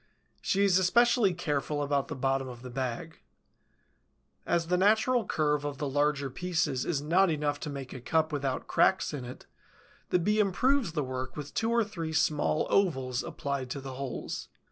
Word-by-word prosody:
She 200 +1 +1
is 190 -2 +4
especially 235 +2 +4
careful 145 -3 -1
about 140 -1 0
the 155 - -5
bottom 135 0 0
of 120 -1 -9
the 125 - -8
bag. 130 +5 -4 1.3
As 170 -1 +1
the 180 +2 +1
natural 220 +4 +3
curve 150 -2 +1
of 145 -1 -4
the 145 - -2
larger 145 -1 0
pieces 160 -6 -1
is 145 -4 -1
not 180 +5 +3
enough 145 -2 -1
to 150 - -5
make 140 -2 -6
a 130 - -8
cup 160 +4 +1
without 135 -2 -2
cracks 190 -4 +2
in 135 -4 -5
it, 125 - -10 0.6
the - - +3
Bee 210 +5 +1
improves 210 - +2
the 150 -3 0
work 130 +1 -5
with 145 -1 -6
two 225 - 0
or 235 0 +3
three 170 -7 -5
small 155 -1 +1
ovals 130 -10 +1
applied 140 -2 -4
to 140 - -4
the 135 -1 -7
holes. 130 -2 -5
150 Hz, 180 wpm, -29 LUFS, 135-180 Hz, 1.3 s, is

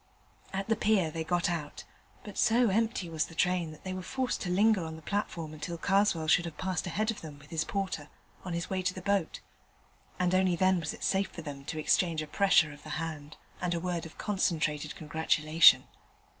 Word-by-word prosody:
At 195 0 -3
the 225 - +2
pier 210 -7 +2
they 165 0 -3
got 175 +1 +1
out, 160 -4 -4 0.4
but 205 - -9
so 235 +1 +4
empty 220 -2 0
was 160 -1 -1
the 165 - -13
train 180 -2 +1
that 155 -1 -12
they 185 - -4
were 185 - -4
forced 260 +6 -2
to 180 - -3
linger 200 +1 +3
on 160 0 -6
the 160 - -12
platform 170 -6 -3
until 170 +3 -5
Karswell 195 -3 +2
should 170 +3 +4
have 160 -3 -7
passed 185 -1 -2
ahead 215 +6 0
of 220 - -8
them 150 -3 -9
with 145 +1 -17
his 160 -1 0
porter 190 -7 -3 0.3
on 180 - -5
the 170 0 -2
way 190 -1 -1
to 185 0 -1
the 185 - -6
boat, 200 -4 0 0.8
and 180 0 +1
only 185 -1 +3
then 185 +1 +3
was 160 -2 -4
it - - -11
safe 195 -1 +1
for 165 - -9
them 140 -2 -8
to 160 - -5
exchange 160 +1 +2
a - - -5
pressure 160 -2 +3
of 145 - -14
the 155 -1 -5
hand 155 -2 -6 0.2
and 175 -1 0
a - - -1
word 175 -1 -3
of 160 - -17
concentrated 155 -7 -1
congratulation. 155 +1 +4
175 Hz, 215 wpm, -30 LUFS, 155-190 Hz, 0.8 s, so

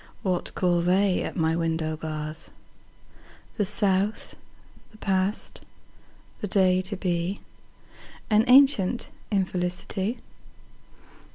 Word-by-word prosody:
What 185 -3 -1
call 175 -2 +2
they 185 +2 +2
at - - -4
my 160 -1 +1
window 160 -1 -1
bars? 155 0 -4 1.1
The 205 - +1
South, 200 +1 +1 0.5
the 215 - -18
past, 195 0 -1 0.8
the 210 - -3
day 185 -1 +3
to 190 +2 -4
be, 180 +1 -2 0.9
An 215 0 +4
ancient 250 -4 +5 0.2
infelicity. 190 +2 -1
185 Hz, 95 wpm, -26 LUFS, 175-205 Hz, 1.1 s, ancient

